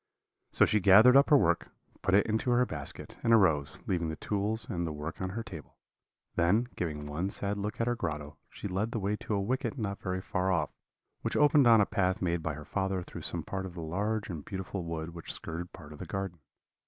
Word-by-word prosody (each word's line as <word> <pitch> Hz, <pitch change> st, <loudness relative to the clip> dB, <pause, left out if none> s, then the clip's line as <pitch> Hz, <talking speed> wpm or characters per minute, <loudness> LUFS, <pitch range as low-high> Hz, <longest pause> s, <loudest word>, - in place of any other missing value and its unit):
So -, -, +5 dB
she 105 Hz, -, +2 dB
gathered 105 Hz, +7 st, +8 dB
up 140 Hz, +1 st, +6 dB
her 145 Hz, -, +8 dB
work, 85 Hz, -8 st, +2 dB, 0.3 s
put 95 Hz, -, +3 dB
it 105 Hz, -, +5 dB
into 110 Hz, +3 st, 0 dB
her 125 Hz, +1 st, +4 dB
basket, 75 Hz, -, -7 dB
and 115 Hz, -, +2 dB
arose, 80 Hz, -10 st, +3 dB
leaving 85 Hz, -3 st, 0 dB
the 80 Hz, -, -3 dB
tools 105 Hz, +5 st, -2 dB
and 85 Hz, -1 st, -2 dB
the -, -, -3 dB
work 75 Hz, +4 st, -6 dB
on 95 Hz, -, -1 dB
her 115 Hz, +5 st, -4 dB
table; 85 Hz, -9 st, -10 dB, 0.6 s
then, 105 Hz, +9 st, +3 dB
giving 75 Hz, -4 st, -3 dB
one 80 Hz, +6 st, -2 dB
sad 100 Hz, +1 st, -2 dB
look 105 Hz, +1 st, -4 dB
at 115 Hz, -, +2 dB
her 120 Hz, -, +1 dB
grotto, 75 Hz, -7 st, -4 dB
she -, -, -6 dB
led 100 Hz, +5 st, -2 dB
the 115 Hz, -, -1 dB
way 100 Hz, +1 st, 0 dB
to 105 Hz, -, -3 dB
a -, -, +1 dB
wicket 125 Hz, +8 st, -1 dB
not 100 Hz, -4 st, -3 dB
very 95 Hz, 0 st, -2 dB
far 95 Hz, 0 st, -1 dB
off, 80 Hz, -5 st, 0 dB, 0.5 s
which -, -, -1 dB
opened 145 Hz, -3 st, +6 dB
on 115 Hz, -2 st, +7 dB
a -, -, +4 dB
path 95 Hz, +1 st, 0 dB
made 85 Hz, -2 st, 0 dB
by 80 Hz, -2 st, -2 dB
her 75 Hz, 0 st, -9 dB
father 95 Hz, -2 st, -1 dB
through -, -, -9 dB
some -, -, -3 dB
part 95 Hz, -1 st, -4 dB
of 90 Hz, -, -11 dB
the 85 Hz, -, -5 dB
large 105 Hz, +7 st, -1 dB
and 80 Hz, -6 st, -6 dB
beautiful 95 Hz, -1 st, -5 dB
wood 80 Hz, 0 st, -4 dB
which 85 Hz, -1 st, -7 dB
skirted 85 Hz, +2 st, -5 dB
part 75 Hz, -5 st, -11 dB
of 75 Hz, -, -12 dB
the 90 Hz, -, -6 dB
garden. 95 Hz, -2 st, -4 dB
95 Hz, 230 wpm, -30 LUFS, 85-105 Hz, 0.6 s, gathered